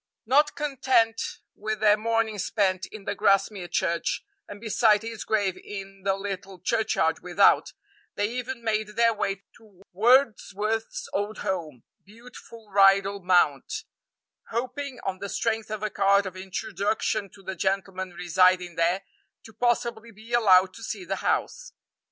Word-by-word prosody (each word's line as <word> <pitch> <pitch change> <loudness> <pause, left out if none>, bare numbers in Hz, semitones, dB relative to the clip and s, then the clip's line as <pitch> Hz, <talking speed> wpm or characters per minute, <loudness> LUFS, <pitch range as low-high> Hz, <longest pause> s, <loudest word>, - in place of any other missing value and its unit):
Not 295 +6 +3
content 255 -6 +1 0.3
with 215 +1 -4
their 210 -1 +5
morning 225 -1 -1
spent 190 -2 0
in 210 -2 -11
the - - -1
Grasmere 195 -2 +1
Church, 170 0 -1 0.2
and 205 - -9
beside 220 -1 +3
his 225 -1 -6
grave 200 -4 0
in 195 -1 -8
the 195 -1 +1
little 195 -1 -6
churchyard 195 -4 0
without, 180 +2 +3 0.4
they 205 - 0
even 250 0 -5
made 215 -1 -1
their 230 0 +4
way 195 -2 -3
to 205 -4 -21
Wordsworth's 225 - +1
old 205 +1 -2
home 160 -10 -3 0.2
beautiful 230 +1 -14
Rydal 195 0 +4
Mount 175 -6 +2 0.7
hoping, 255 +3 -4
on 190 -1 -3
the 200 - -5
strength 225 0 -1
of 215 0 -5
a 215 - -1
card 200 -1 +3
of 190 -1 -6
introduction 200 +2 -2
to 195 - -17
the 190 - -4
gentleman 190 -1 -2
residing 180 -1 +2
there, 175 +3 +1 0.4
to 225 - -14
possibly 235 0 -1
be 225 +2 -12
allowed 190 -5 +5
to 230 - -11
see 370 - -5
the - - -2
house. - - -2
205 Hz, 145 wpm, -26 LUFS, 190-225 Hz, 0.7 s, their